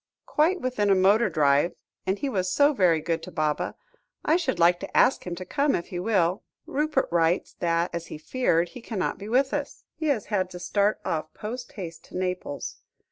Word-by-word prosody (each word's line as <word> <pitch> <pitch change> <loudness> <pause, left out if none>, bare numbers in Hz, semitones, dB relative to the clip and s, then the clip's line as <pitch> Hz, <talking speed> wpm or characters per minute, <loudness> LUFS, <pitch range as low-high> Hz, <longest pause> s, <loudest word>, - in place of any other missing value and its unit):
"Quite 345 +5 +2
within 245 -5 0
a 195 - +6
motor 200 +4 +4
drive; 145 +1 +3 0.3
and 190 +2 +1
he 280 - -2
was 185 -7 -1
so 290 +1 +4
very 175 - +3
good 165 +1 -1
to 185 - -9
Baba, 155 -2 -1 0.5
I 310 - +4
should 325 -7 0
like 175 +1 +4
to 195 - -4
ask 260 - +4
him 175 - -3
to 185 +1 -7
come 285 +8 +1
if 170 - -4
he 180 -3 -4
will. 185 -2 +1 0.2
Rupert 300 -1 0
writes, 170 +1 +1
that, 170 0 0
as 170 0 -4
he - - -7
feared, 170 -2 +1
he 200 - -10
cannot 210 -6 -3
be 205 +1 -7
with 265 +3 +2
us. 290 -1 -4
He 315 0 -3
has 260 -8 +1
had 185 -2 +1
to 180 - -8
start 205 +3 +1
off 155 -1 -2
post 240 +3 -6
haste 165 -4 -7
to - - -8
Naples. 180 -6 -3
185 Hz, 205 wpm, -26 LUFS, 170-250 Hz, 0.5 s, a